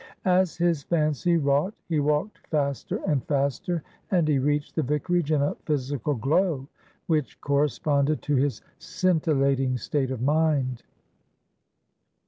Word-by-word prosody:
As 185 -1 +2
his 170 -3 +1
fancy 155 +2 +1
wrought, 145 +6 +1
he 160 -3 +1
walked 150 +8 0
faster 140 -3 -1
and 145 -5 +1
faster, 140 +3 -1 0.3
and 175 -6 +2
he 145 -3 +2
reached 145 +2 0
the 160 - +2
vicarage 150 +3 0
in 145 -2 +3
a 145 - 0
physical 145 -1 -1
glow 140 - +1 0.4
which 155 -4 -1
corresponded 145 +1 +1
to 145 - 0
his 135 +1 0 0.2
scintillating 140 -8 +1
state 135 +3 -1
of 130 -3 -3
mind. 140 -2 +1
150 Hz, 125 wpm, -26 LUFS, 140-160 Hz, 0.4 s, in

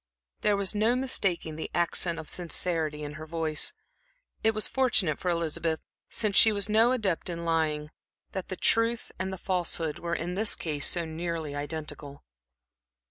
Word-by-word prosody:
There 210 -1 +3
was 200 0 0
no 220 +3 +3
mistaking 190 -11 -1
the 160 - -4
accent 170 0 +1
of 160 -2 -7
sincerity 165 -3 -1
in 145 0 -5
her 155 - -7
voice. 160 -2 0 0.7
It 220 0 +3
was 215 - +2
fortunate 235 - +2
for 180 - -1
Elizabeth, 165 -1 0 0.3
since 215 -3 0
she 220 - +8
was 200 -1 0
no 220 +3 +5
adept 200 -9 0
in 170 -1 -4
lying, 155 -2 0 0.4
that 190 -2 -4
the 185 - -4
truth 230 +3 +2
and 190 0 -2
the 190 - -4
falsehood 175 -4 -1
were 170 0 -2
in 175 +2 -2
this 210 +3 +3
case 150 -4 -1
so 170 -2 +1
nearly 160 -2 -3
identical. 145 -1 -6
170 Hz, 165 wpm, -28 LUFS, 160-200 Hz, 0.7 s, she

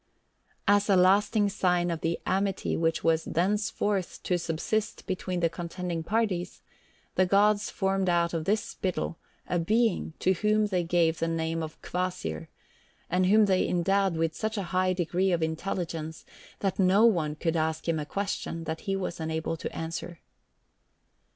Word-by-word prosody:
As 205 +1 +4
a 195 - +6
lasting 200 +3 +4
sign 180 -3 +1
of 165 - -3
the 165 +1 -1
amity 195 +1 0
which 165 0 0
was 165 0 +3
thenceforward 200 +1 0 0.2
to 180 -1 0
subsist 175 +6 -2
between 185 -1 -3
the 170 - +4
contending 170 0 -4
parties, 185 -2 -1 0.5
the 185 - +3
gods 205 +2 +3
formed 195 -1 0
out 170 -1 +2
of 160 -2 -2
this 210 +4 +1
spittle 180 -2 -3 0.3
a 175 - 0
being 220 0 +1
to 190 - +2
whom 210 +3 +2
they 185 -4 0
gave 170 -1 +2
the 165 - 0
name 165 0 -1
of 155 -1 -6
Kvasir, 175 - -3 0.6
and 180 +1 +3
whom 215 +2 +6
they 190 -2 +2
endowed 190 0 +1
with 165 0 0
such 220 +3 -3
a 200 - -1
high 185 0 +2
degree 180 +1 0
of 170 -2 +1
intelligence 160 -1 -3 0.4
that 195 -1 -1
no 195 +4 +5
one 165 -9 +2
could 165 +1 -1
ask 160 0 -1
him 165 -2 +1
a 150 - -3
question 195 -4 -3
that 160 0 -4
he 195 - +2
was 185 -3 -3
unable 160 0 -2
to - - -5
answer. 165 +1 -5
180 Hz, 165 wpm, -28 LUFS, 165-195 Hz, 0.6 s, a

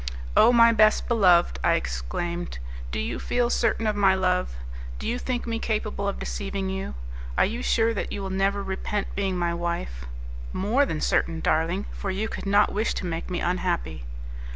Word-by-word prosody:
"Oh, - - +7
my 230 -1 +7
best 215 -1 +4
beloved!" 180 - +4
I - - +4
exclaimed, 65 - -3 0.3
"do 70 - -2
you 75 - -2
feel 245 -1 +1
certain 225 -1 +1
of 215 -1 +1
my 195 -2 +4
love? 180 - +1 0.4
Do - - -5
you 245 - -1
think 250 -2 -2
me 230 -1 -2
capable 215 -2 -2
of 200 - -1
deceiving 195 -1 -3
you? 190 - -4 0.4
Are - - +5
you 230 +5 -3
sure 230 -2 +2
that 210 - -3
you 200 - -4
will 190 - -4
never 195 +1 +1
repent 195 +2 -2
being 195 -2 -1
my 170 -1 0
wife?" 170 - -3 0.5
"More 240 +9 +2
than 155 -8 -3
certain, 165 -1 +1
darling; 170 +6 +1
for 200 - -4
you 195 +3 -1
could 205 - -5
not 205 +1 +4
wish 215 +2 0
to - - -3
make 165 -2 -3
me 180 -1 -2
unhappy." 175 - -1
195 Hz, 185 wpm, -26 LUFS, 170-215 Hz, 0.5 s, Oh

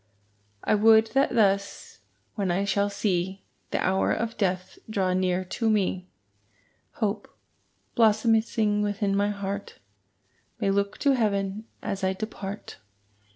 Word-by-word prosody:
I - - +2
would 220 +1 +5
that 270 -2 +2
thus, 200 -3 0 0.3
when 200 -3 -2
I 190 +3 +1
shall 200 0 +1
see 190 -2 -1 0.3
The - - -1
hour 190 +1 +2
of 230 0 -2
death 185 -2 -2
draw 190 -4 0
near 185 0 0
to 220 +5 -1
me, 190 -3 0 0.9
Hope, 210 -1 -2 0.6
blossoming 220 -1 +3
within 205 -1 0
my 205 +1 +2
heart, 200 0 -5 0.8
May 195 - +1
look 200 0 0
to 280 - +4
heaven 210 -4 0 0.2
as 195 0 -3
I 190 0 +2
depart. 200 0 -7
200 Hz, 125 wpm, -26 LUFS, 195-215 Hz, 0.9 s, would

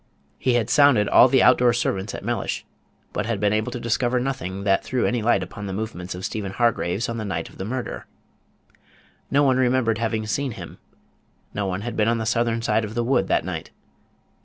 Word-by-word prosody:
He 125 -2 +1
had 120 0 0
sounded 140 -8 +5
all - - +7
the 130 +1 +4
out 125 - +6
door 120 -1 +4
servants 100 -5 -2
at - - -8
Mellish, - - -2 0.5
but 105 - -2
had 115 -4 -1
been 105 0 +2
able 110 0 0
to 125 - -5
discover 120 +2 0
nothing 120 -8 -3
that 95 -1 +2
threw 125 -1 -1
any 120 -1 0
light 120 +2 +2
upon 105 -2 -7
the 95 - -4
movements 95 -4 -5
of 90 - -6
Stephen 100 -3 -4
Hargraves 115 -1 0
on 115 - -4
the 110 - -3
night 85 -5 -3
of - - -18
the 95 - -3
murder. 125 +3 -5 1.2
No 145 +1 +3
one 130 -2 +3
remembered 125 -3 +2
having 110 -1 -1
seen 135 +3 -2
him: - - -10 0.7
no 100 -1 -2
one 95 +1 -3
had 120 +2 -5
been 105 0 +2
on 115 0 +2
the 110 - -3
southern 115 -1 0
side 110 -1 +1
of 105 +1 -6
the 120 - 0
wood 125 +1 +1
that - - +1
night. - - -5
115 Hz, 215 wpm, -23 LUFS, 105-120 Hz, 1.2 s, all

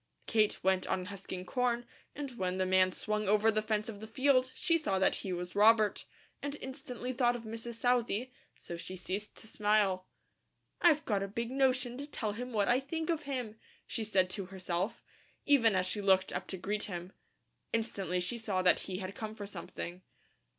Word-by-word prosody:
Kate 215 -2 +2
went 190 0 +2
on 185 -1 -1
husking 185 -1 -6
corn 240 +2 0 0.3
and 285 -2 -4
when 185 0 0
the 185 - +1
man 185 0 +4
swung 215 +2 -2
over 215 +2 +5
the 215 0 +1
fence 215 -1 0
of 215 -3 -6
the 220 - -8
field 255 +2 +3
she 335 - +2
saw 310 -12 +1
that 190 - +3
he 190 - -4
was 180 0 -4
Robert, 215 0 +5 0.4
and 285 0 -3
instantly 255 -1 -5
thought 245 -1 +3
of 240 - -6
Mrs. 230 +1 -6
Southey, 245 0 +1 0.3
so 170 - -7
she 170 +2 -7
ceased 195 +3 -4
to - - -9
smile. 205 -4 +2 0.7
"I've 310 -4 +5
got 205 -3 +1
a 195 - -1
big 230 +4 -3
notion 260 -2 +1
to 285 - -5
tell 220 -7 -2
him 245 +4 -5
what 210 -3 +2
I 245 +2 +4
think 320 +4 -2
of 315 -2 -2
him," 240 -5 -3 0.3
she 225 - -3
said 190 -4 +2
to 195 -1 -4
herself, 185 +1 -3 0.4
even 235 -8 +5
as 185 0 +2
she 205 +3 -1
looked 190 -1 +3
up - - -3
to 190 - -5
greet 205 +3 -2
him. 180 -1 -6 0.6
Instantly 200 -5 -1
she 185 +7 -1
saw 195 -5 0
that 180 - +5
he 185 -1 -4
had 190 0 -5
come 220 0 -6
for 205 - -6
something. 180 -2 -7
215 Hz, 195 wpm, -33 LUFS, 190-245 Hz, 0.7 s, over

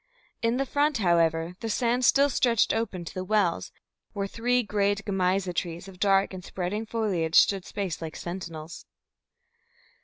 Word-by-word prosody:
In 230 +1 +1
the 275 - 0
front, 290 +1 +1
however, 170 -3 +2
the 225 - -4
sand 245 +3 +1
still 280 +3 +5
stretched 235 -3 +2
open 205 -6 -3
to - - -8
the 185 - -4
wells, 195 -3 0 0.4
where 200 -2 -2
three 245 +4 0
great 200 -1 0
Gemeiza 190 -2 0
trees 170 +1 -4
of 185 -2 -13
dark 195 -1 +3
and 185 -1 -7
spreading 190 +5 -4
foliage 190 -8 -1
stood 195 -3 +5
spaced 190 -6 -4
like 160 -1 -6
sentinels. 170 -3 -7
195 Hz, 155 wpm, -27 LUFS, 175-225 Hz, 0.4 s, still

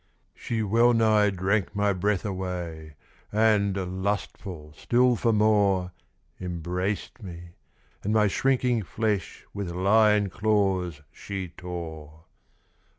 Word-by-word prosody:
She 115 -2 -3
well 115 +4 +4
nigh 110 -2 +4
drank 95 +2 -1
my 100 0 +2
breath 100 +1 0
away; 90 -5 -5 0.4
And, 100 -4 +1
lustful 95 -6 -4
still 125 +7 +3
for 115 +1 +1
more, 100 -4 +3 0.5
Embraced 90 +5 -3
me, 85 -3 -9 0.5
and 105 - -1
my 110 -1 +4
shrinking 125 +2 +1
flesh 105 0 -2
With 100 -3 -4
lion 100 +2 +3
claws 95 -6 0
she 95 -3 -6
tore. 80 -3 -8
100 Hz, 105 wpm, -26 LUFS, 90-110 Hz, 0.5 s, well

